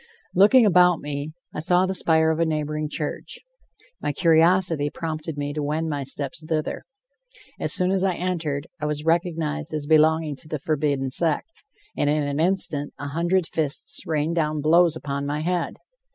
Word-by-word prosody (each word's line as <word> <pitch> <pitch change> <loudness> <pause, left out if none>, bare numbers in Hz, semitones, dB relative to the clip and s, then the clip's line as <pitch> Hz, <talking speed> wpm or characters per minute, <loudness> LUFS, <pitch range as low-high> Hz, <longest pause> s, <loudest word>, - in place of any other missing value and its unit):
Looking 215 +6 +6
about 180 -3 +5
me, 145 +1 -5 0.2
I - - -4
saw 180 +4 +3
the 190 - -2
spire 160 -3 +3
of 160 - -2
a - - +3
neighboring 150 -1 -2
church. 150 0 -4 0.6
My - - -1
curiosity 165 -1 +3
prompted 155 0 -5
me 145 0 -3
to 150 - -3
wend 155 +2 -2
my 145 -1 -2
steps 140 +2 -4
thither. 155 -1 -3 0.7
As - - -2
soon 180 0 +2
as 190 -1 +1
I 190 -2 +1
entered, 160 -6 -2 0.2
I 150 - -1
was 150 0 -3
recognized 160 -2 -1
as 150 -1 -2
belonging 155 -1 +3
to 155 - -15
the 155 - -3
forbidden 140 -2 -1
sect, 165 - -1 0.3
and 145 - +1
in 150 0 +1
an 145 +1 -2
instant 165 -5 +1
a 145 0 -6
hundred 170 +4 +1
fists 155 -3 0
rained 155 +1 0
down 155 -2 0
blows 165 +2 +4
upon 140 -2 -4
my 150 +1 -2
head. 175 +1 -1
155 Hz, 175 wpm, -24 LUFS, 150-170 Hz, 0.7 s, Looking